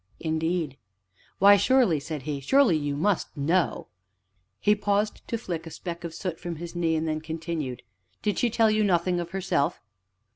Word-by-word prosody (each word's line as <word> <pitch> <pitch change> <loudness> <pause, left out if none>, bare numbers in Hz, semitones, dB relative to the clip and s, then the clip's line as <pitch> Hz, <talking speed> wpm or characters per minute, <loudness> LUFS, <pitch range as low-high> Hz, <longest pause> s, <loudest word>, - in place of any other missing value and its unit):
"Indeed?" 160 -2 -1 0.6
"Why, 200 +1 +7
surely," 240 - +3
said 150 -1 -6
he, 145 -1 -3
"surely 235 - +4
you 145 -2 -1
must 175 0 0
know 165 +5 +1 0.4
" - - -50 0.3
He 210 - +4
paused 205 0 0
to 230 - -1
flick 170 -7 -5
a - - -5
speck 170 +2 -7
of 165 -1 -6
soot 180 -3 -4
from 175 -2 -5
his 170 +2 -8
knee, 165 -2 +1
and 160 +1 -1
then 155 0 -1
continued: 160 -5 -4 0.4
"Did 210 -3 0
she 240 - +2
tell 225 -1 +3
you 215 0 +2
nothing 180 -2 +2
of 170 -1 -4
herself?" 190 -6 0
170 Hz, 180 wpm, -26 LUFS, 155-200 Hz, 0.6 s, Why